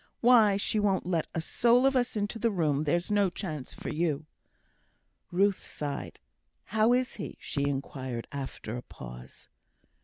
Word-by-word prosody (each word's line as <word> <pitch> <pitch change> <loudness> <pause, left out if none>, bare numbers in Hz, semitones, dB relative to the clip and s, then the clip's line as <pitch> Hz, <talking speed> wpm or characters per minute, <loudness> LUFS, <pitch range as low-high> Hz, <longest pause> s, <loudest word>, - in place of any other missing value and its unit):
Why, 225 -5 +6
she 210 +1 0
won't 200 -2 +1
let 170 -3 0
a 165 - 0
soul 240 +8 +3
of 270 0 +4
us 245 -2 +1
into 210 +2 -2
the 230 - +2
room; 155 -7 +1
there's 170 +6 +1
no 205 -2 +4
chance 155 -7 -5
for - - -6
you!" 155 -2 -1 1.1
Ruth 195 +2 +2
sighed. 145 -2 -5 0.4
"How 220 +2 +2
is 250 0 +1
he?" 200 - -6
she 140 -1 -2
inquired, 130 -3 -4
after 135 -5 -5
a 125 - -4
pause. 60 - -11
175 Hz, 155 wpm, -29 LUFS, 140-215 Hz, 1.1 s, Why